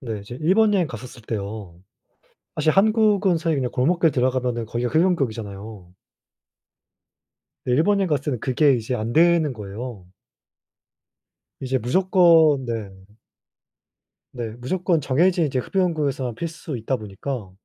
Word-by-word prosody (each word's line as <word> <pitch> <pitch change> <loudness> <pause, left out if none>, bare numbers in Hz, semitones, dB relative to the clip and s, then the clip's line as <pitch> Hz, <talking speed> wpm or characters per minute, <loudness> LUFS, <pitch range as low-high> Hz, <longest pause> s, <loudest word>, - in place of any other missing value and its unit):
네. 115 -6 -5
이제 110 +5 -9
일본 205 +6 +3
여행 180 -4 +2
갔었을 120 -1 -10
때요. 100 -5 -6 0.7
사실 155 +1 +1
한국은 205 -2 +3
사실 165 -2 0
그냥 125 -2 -1
골목길 165 +5 +2
들어가면은 125 -3 -1
거기가 120 +1 -2
흡연구역이잖아요. 110 - -2 1.7
근데 125 -1 +1
일본 200 +7 +3
여행 195 - 0
갔을 145 -3 -1
때는 130 -6 -2
그게 140 +1 +3
이제 120 +1 -3
안 115 0 -3
되는 165 -2 +3
거예요. 105 -2 -8 1.5
이제 130 0 -1
무조건 165 - +4
네. 115 -4 -4 1.4
네. 120 -3 -5
무조건 170 +6 0
정해진 170 +6 +2
이제 130 -2 -2
흡연구역에서만 145 - -1
피울 165 - -3
수 160 -3 -7
있다 120 +3 -2
보니까 105 +1 -6
130 Hz, 305 characters per minute, -22 LUFS, 115-170 Hz, 1.7 s, 무조건